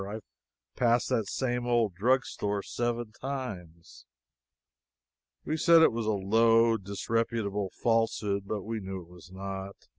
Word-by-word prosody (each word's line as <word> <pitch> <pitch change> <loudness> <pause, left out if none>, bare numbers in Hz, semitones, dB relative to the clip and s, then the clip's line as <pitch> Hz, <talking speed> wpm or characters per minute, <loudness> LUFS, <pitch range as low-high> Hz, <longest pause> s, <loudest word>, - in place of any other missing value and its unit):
I've 110 +1 -6 0.5
passed 120 -1 +2
this 115 -6 0
same 125 -2 -1
old 115 -5 +2
drugstore 105 -1 0
seven 120 -2 -2
times." 105 -11 -7 1.4
We 155 - -1
said 165 +1 +6
it - - +6
was 115 -1 -3
a - - +3
low, 115 +3 +4
disreputable 105 0 -2
falsehood 110 -4 +1
(but 105 -2 -3
we 110 +1 -3
knew 95 -2 -6
it 85 - -20
was 90 0 -15
not). 95 +1 -6
110 Hz, 130 wpm, -29 LUFS, 100-120 Hz, 1.4 s, said